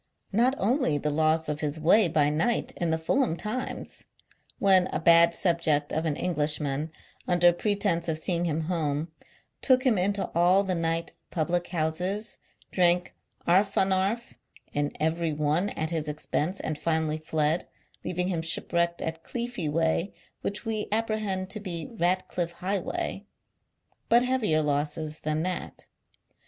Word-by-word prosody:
Not 245 +6 +3
only 220 - +1
the 150 +1 -1
loss 155 +1 +2
of 150 0 -2
his 150 0 -2
way 180 +6 +5
by 150 -2 +2
night 215 +11 0
in 170 - -1
theFulham 160 +5 +1
times 235 +7 -5 0.3
— - - -31
when 190 -2 +5
a - - -3
bad 170 0 +6
subject 160 -5 +1
of 160 +1 0
an 150 - 0
Englishman, 150 -3 0 0.4
under 175 -1 +5
pretence 195 -3 0
of 160 -1 0
seeing 170 +1 0
him 160 -1 -1
home, 155 -2 -1 0.5
took 255 -1 +4
him 240 -8 +3
into 200 +2 0
all 180 +4 +4
the 190 -2 -1
night 165 -1 -1 0.2
public 175 +1 -1
houses, 180 +6 -2 0.3
drank 175 -1 +2 0.3
"arfanarf" 195 +4 +1 0.4
in 145 0 0
every 160 +1 0
one 150 +6 +1
at 160 -3 -3
his 160 -2 -2
expense, 155 +4 -2
and 155 -1 -4
finally 160 -1 0
fled, 155 +1 0 0.4
leaving 180 0 -1
him 170 -3 -1
shipwrecked 170 +1 0
at 160 0 -4
Cleefeeway, 170 -7 -1 0.3
which 205 +3 -4
we 220 -1 -2
apprehend 215 -4 -1
to 215 - -4
be 175 -5 -4
Ratcliffe 175 -2 -1
Highway 195 +2 -3 0.4
— - - -43
but 240 +1 +5
heavier 225 -12 +1
losses 150 +2 -1
thau 155 0 -2
that. 185 0 -4
170 Hz, 145 wpm, -27 LUFS, 155-195 Hz, 0.5 s, bad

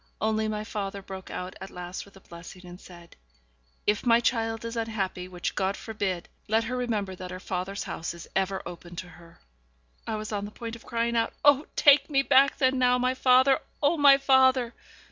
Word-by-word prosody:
Only 220 0 0
my 210 0 -3
father 200 -2 -5
broke 190 -1 -9
out 180 0 -6
at 190 - -7
last 180 +1 -7
with 200 - -19
a - - -17
blessing, 175 +2 -12
and 175 +1 -11
said, 170 -2 -14 0.7
'If 210 0 +1
my 235 -1 +5
child 225 -2 -1
is 230 +1 -5
unhappy 210 -5 -3
which 180 -1 -4
God 190 +1 -1
forbid 195 -6 -3 0.2
let 220 +2 +2
her 245 +3 -3
remember 220 -6 -2
that 185 0 -8
her 185 0 -7
father's 190 +2 -4
house 165 - -5
is 170 - -11
ever 195 0 0
open 175 0 -9
to 180 - -6
her.' 170 -1 -17 0.7
I 220 - -2
was 215 0 -5
on 205 -1 -2
the - - -7
point 230 +1 -7
of 230 - -15
crying 235 0 -1
out, 230 0 +1
'Oh! 290 0 +5
take 290 +1 +6
me 275 -2 +2
back 275 +1 +4
then 260 -1 +2
now, 250 0 +4
my 250 +1 +1
father! 260 +1 +4 0.2
oh, 290 +4 +4
my 285 -3 +7
father!' 260 -3 +3
215 Hz, 205 wpm, -27 LUFS, 185-250 Hz, 0.7 s, my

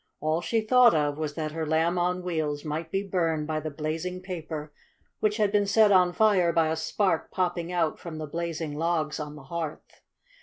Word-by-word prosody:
All 155 +2 0
she 225 +5 0
thought 240 -1 +5
of 145 -1 0
was 150 -2 -3
that 155 -2 -3
her 160 +1 -3
Lamb 165 +3 +2
on 180 +1 0
Wheels 155 -4 -2
might 155 +2 -3
be 195 +3 -1
burned 165 -6 0
by 155 0 -2
the 155 +1 -4
blazing 160 +5 -4
paper, 160 -5 -6 0.5
which 210 0 +1
had 210 -2 +2
been 205 -1 +2
set 210 +1 +5
on 180 -2 +5
fire 190 -4 +3
by 165 -1 +2
a 160 - 0
spark 165 +2 0
popping 175 -2 -1
out 170 -3 0
from 165 -2 -7
the 155 - -4
blazing 165 -1 -4
logs 160 0 -1
on 150 -1 -6
the 150 - -11
hearth. 160 +1 -6
165 Hz, 200 wpm, -27 LUFS, 155-180 Hz, 0.5 s, thought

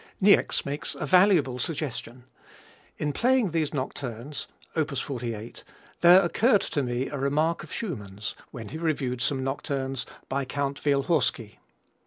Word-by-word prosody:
Niecks 200 +1 +4
makes 145 +2 -3
a - - -3
valuable 170 -7 +4
suggestion: 125 -5 -4 0.7
"In 150 -1 -1
playing 245 - +2
these 160 -3 0
nocturnes 130 0 -4 0.3
op. 160 -3 +1
48 120 -4 -5 0.4
there 180 +2 +8
occurred 205 +4 +3
to 145 - -1
me 125 0 -1
a 145 - -4
remark 150 +5 +1
of - - -12
Schumann's, 105 - -5 0.2
when 115 -3 -8
he 160 - -6
reviewed 135 -7 -1
some 130 0 0
nocturnes 135 -1 -2 0.2
by 140 +1 -1
Count 140 +2 -3
Wielhorski. 140 -6 +1
140 Hz, 135 wpm, -27 LUFS, 125-160 Hz, 0.7 s, there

